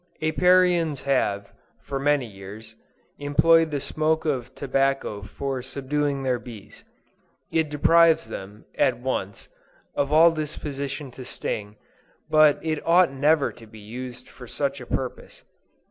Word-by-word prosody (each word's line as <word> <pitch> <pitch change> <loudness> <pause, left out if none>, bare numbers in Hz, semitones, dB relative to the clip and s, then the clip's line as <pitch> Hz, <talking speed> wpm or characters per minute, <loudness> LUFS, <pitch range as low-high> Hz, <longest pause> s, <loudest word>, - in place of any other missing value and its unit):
Apiarians 170 -2 +3
have, 100 -7 0 0.3
for 135 - -4
many 145 -1 +2
years, 105 +2 -11 0.5
employed 165 +3 +4
the 145 -2 -2
smoke 155 +3 0
of 130 -4 -2
tobacco 135 -5 -1
for 130 +6 -4
subduing 140 +2 -2
their 125 -2 0
bees. 115 -5 -12 0.7
It 160 -2 +1
deprives 165 -1 +4
them, 105 -1 -9
at 130 -3 +2
once, 120 -6 -4 0.5
of 140 0 -1
all 165 +2 +7
disposition 145 -3 -5
to 130 - -10
sting, 105 -3 -5 0.6
but 155 -1 +6
it 155 -2 -1
ought 170 -1 +4
never 145 +2 +2
to 115 - -15
be 110 - -14
used 120 +4 -8
for 125 - -13
such 140 +2 -2
a 125 - -10
purpose. 130 -2 -5
140 Hz, 130 wpm, -24 LUFS, 125-155 Hz, 0.7 s, all